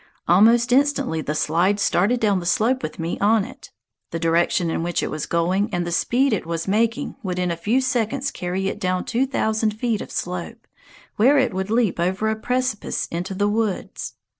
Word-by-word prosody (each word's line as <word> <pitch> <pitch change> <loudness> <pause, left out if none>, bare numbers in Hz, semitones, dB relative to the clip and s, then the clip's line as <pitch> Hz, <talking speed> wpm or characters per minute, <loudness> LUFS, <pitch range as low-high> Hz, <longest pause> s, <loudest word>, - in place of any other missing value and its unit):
Almost 230 +7 +5
instantly 275 - +2
the 150 0 -3
slide 175 +7 +1
started 200 +5 +2
down 205 -4 +2
the 175 - -7
slope 250 +5 +2
with - - -5
me 165 -1 -3
on 210 0 +3
it. - - -12 0.4
The - - -3
direction 165 +1 +1
in - - -1
which 175 0 -1
it - - -3
was 155 -1 -4
going 180 +5 0
and 175 -2 -1
the 170 - -4
speed 250 +8 +2
it 205 - -1
was 165 +1 -3
making 225 +5 0
would 185 -5 -3
in 180 -1 0
a - - -1
few 215 +10 +1
seconds 260 +1 -1
carry 185 +2 -3
it 205 - -3
down 185 -2 -1
two 250 +3 0
thousand 220 -4 0
feet 230 -4 0
of - - -7
slope, 180 +6 -5 0.5
where 265 +7 +5
it 260 -5 +2
would 190 +1 -3
leap 225 -5 +1
over 190 +5 0
a - - -1
precipice 250 0 -2
into 180 +3 -4
the 205 +2 +1
woods. 210 -2 -2
205 Hz, 200 wpm, -22 LUFS, 175-235 Hz, 0.5 s, Almost